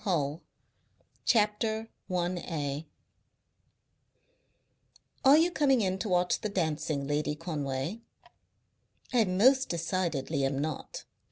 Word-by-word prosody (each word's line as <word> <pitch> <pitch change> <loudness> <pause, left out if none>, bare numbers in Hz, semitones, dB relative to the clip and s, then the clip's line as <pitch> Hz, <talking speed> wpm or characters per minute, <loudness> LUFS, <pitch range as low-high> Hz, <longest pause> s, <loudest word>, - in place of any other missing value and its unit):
HULL 155 -5 0 0.9
1921 210 -4 -1
CHAPTER - - -9
I 145 +1 -3 2.4
"Are 275 +2 +8
you 335 +3 +3
coming 270 -7 +3
in 190 -1 0
to 210 - -3
watch 180 0 +2
the 215 - -2
dancing, 155 -6 -1
Lady 150 +1 -1
Conway?" 150 +3 -3 1.1
"I 235 -3 +4
most 255 +9 +4
decidedly 165 -5 -1
am 135 0 0
not. 150 0 -4
175 Hz, 100 wpm, -30 LUFS, 150-215 Hz, 2.4 s, Are